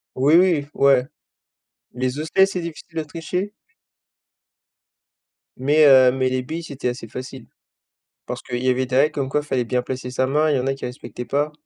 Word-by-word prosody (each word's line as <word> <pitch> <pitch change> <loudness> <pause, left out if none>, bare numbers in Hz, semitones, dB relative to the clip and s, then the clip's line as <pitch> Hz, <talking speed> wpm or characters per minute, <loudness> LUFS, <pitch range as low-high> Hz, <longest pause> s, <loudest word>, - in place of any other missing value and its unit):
Oui, 140 +4 +3
oui, 170 -6 +3
ouais, 135 -2 +4 0.9
les 130 +2 -2
osselets, 160 +5 +3
c'est 195 -1 -4
difficile 165 0 -9
de 160 - 0
tricher 180 +6 -4 2.1
mais, 150 +4 +4
heu, 130 -3 +7
mais, 130 -1 0
les 130 0 -1
billes, 160 +6 -5
c'était 140 -5 -4
assez 120 -2 -5
facile 130 +2 -8 0.8
parce - - -5
qu'il 120 +1 -5
y 130 - +2
avait 130 +1 +1
des 125 - -4
règles 145 +4 +4
comme 140 -3 -3
quoi 150 +1 0
fallait 130 -4 -2
bien 125 +1 0
placer 125 0 -5
sa 130 +1 0
main 150 +4 +1
et 150 - +2
il - - +2
y - - 0
en 130 - -2
a 135 - +1
qui 135 - -7
respectaient 125 0 -7
pas. 145 +3 -1
135 Hz, 195 wpm, -22 LUFS, 130-155 Hz, 2.1 s, heu